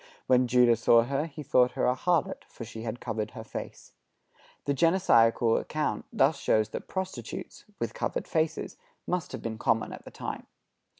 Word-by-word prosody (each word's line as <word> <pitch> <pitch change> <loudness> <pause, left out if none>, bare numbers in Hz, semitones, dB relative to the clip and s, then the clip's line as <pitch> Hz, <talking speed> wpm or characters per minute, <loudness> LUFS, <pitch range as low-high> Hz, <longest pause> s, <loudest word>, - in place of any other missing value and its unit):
When 125 0 +4
Judah 120 -1 +5
saw 115 +1 +5
her 140 +5 -1
he 150 -1 -9
thought 125 -3 +3
her - - 0
a 125 - +3
harlot, 170 +4 0
for 115 - -9
she 110 0 -8
had 115 +1 -4
covered 110 -1 -3
her 110 - -6
face." 110 - -8 0.7
The 140 - +1
Genesiacal 120 -8 +4
account 155 0 -2
thus 140 +2 +3
shows 110 -4 +2
that - - -6
prostitutes, 185 - -6
with - - -3
covered - - -3
faces, 160 0 -1 0.3
must 180 -1 -2
have - - -7
been 110 -1 -4
common 115 -1 +1
at - - -10
the - - -10
time. - - -6
125 Hz, 175 wpm, -28 LUFS, 115-155 Hz, 0.7 s, Judah